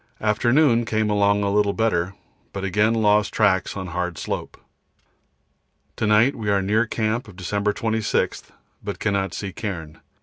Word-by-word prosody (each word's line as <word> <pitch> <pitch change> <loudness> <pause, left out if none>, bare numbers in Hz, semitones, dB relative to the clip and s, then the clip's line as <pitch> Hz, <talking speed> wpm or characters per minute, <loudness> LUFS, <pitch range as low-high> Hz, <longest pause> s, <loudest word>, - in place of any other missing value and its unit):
Afternoon, 120 +3 +3
came 110 -1 0
along 100 0 +2
a 100 - 0
little 105 0 +2
better, 95 -5 0 0.4
but 95 - -5
again 105 +4 +2
lost 105 -2 +3
tracks 100 -2 +1
on 95 - -4
hard 90 -1 -3
slope. - - -5 1.4
To 110 - 0
night 110 +6 +4
we 110 -4 -3
are 100 -1 +3
near 110 +4 +1
camp 110 +3 -1
of 100 - -13
December 100 +3 -1
26, 110 +1 -1 0.3
but - - -4
cannot 100 -4 -1
see 100 -2 -5
cairn. 85 -8 -6
105 Hz, 155 wpm, -23 LUFS, 100-110 Hz, 1.4 s, night